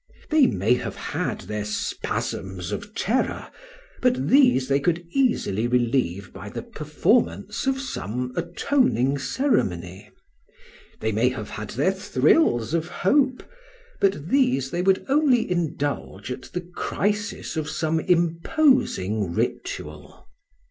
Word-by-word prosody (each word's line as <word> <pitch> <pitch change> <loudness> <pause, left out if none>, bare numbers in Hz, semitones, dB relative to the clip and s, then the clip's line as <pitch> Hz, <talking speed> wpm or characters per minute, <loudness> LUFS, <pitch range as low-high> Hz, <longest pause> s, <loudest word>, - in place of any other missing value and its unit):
They 305 -4 +6
may 100 +6 +2
have 125 - -3
had - - -3
their 105 +2 -4
spasms 95 -3 -3
of 205 +1 -6
terror, 250 +5 -1 0.5
but 250 0 +1
these 250 - +5
they 140 0 +2
could 170 +3 0
easily 230 - +1
relieve 120 -7 0
by - - -8
the - - -6
performance 85 - 0
of 270 0 +1
some 125 - -4
atoning 170 - +1
ceremony; 95 - -1 0.9
they 110 - 0
may 115 +4 +2
have 115 -5 -6
had 110 -2 -6
their 145 - +1
thrills 150 - +2
of 165 0 0
hope, 260 +9 +1 0.6
but 190 -5 +1
these 135 - +2
they 175 - -1
would 190 +1 +2
only 270 -4 +3
indulge 145 - -2
at 125 +1 -7
the 180 - -3
crisis 205 +4 -3
of 155 -1 -2
some 160 +1 0
imposing 170 - +2
ritual. - - -4
155 Hz, 120 wpm, -24 LUFS, -, 0.9 s, They